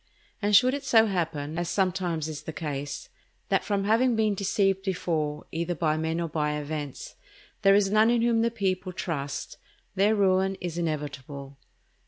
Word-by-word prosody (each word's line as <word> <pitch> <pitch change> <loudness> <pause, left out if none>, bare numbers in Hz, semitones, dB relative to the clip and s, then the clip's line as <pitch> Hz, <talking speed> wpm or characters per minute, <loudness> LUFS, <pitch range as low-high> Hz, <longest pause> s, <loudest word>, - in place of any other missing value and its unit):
And 205 0 +3
should 250 +6 +6
it 285 0 -3
so 225 -4 +5
happen, 165 -5 -2
as 175 - -2
sometimes 180 -5 0
is 155 -2 -6
the 155 - -6
case, 145 -3 -5 0.4
that - - +2
from 200 -2 0
having 230 +4 +3
been 215 -1 +2
deceived 195 -1 +1
before, 160 -6 -2
either 170 +1 -2
by 155 -1 +1
men 160 +1 -1
or 170 - -1
by 150 -1 -1
events, 150 -2 -5 0.5
there 195 0 +6
is 200 -1 +3
none 215 +2 +5
in 235 -1 +2
whom 235 -1 +3
the 230 - +2
people 190 -4 -2
trust, 145 -6 -4 0.3
their 205 +3 +3
ruin 190 -1 +2
is 175 -2 -4
inevitable. 140 -3 -5
180 Hz, 170 wpm, -27 LUFS, 155-205 Hz, 0.5 s, should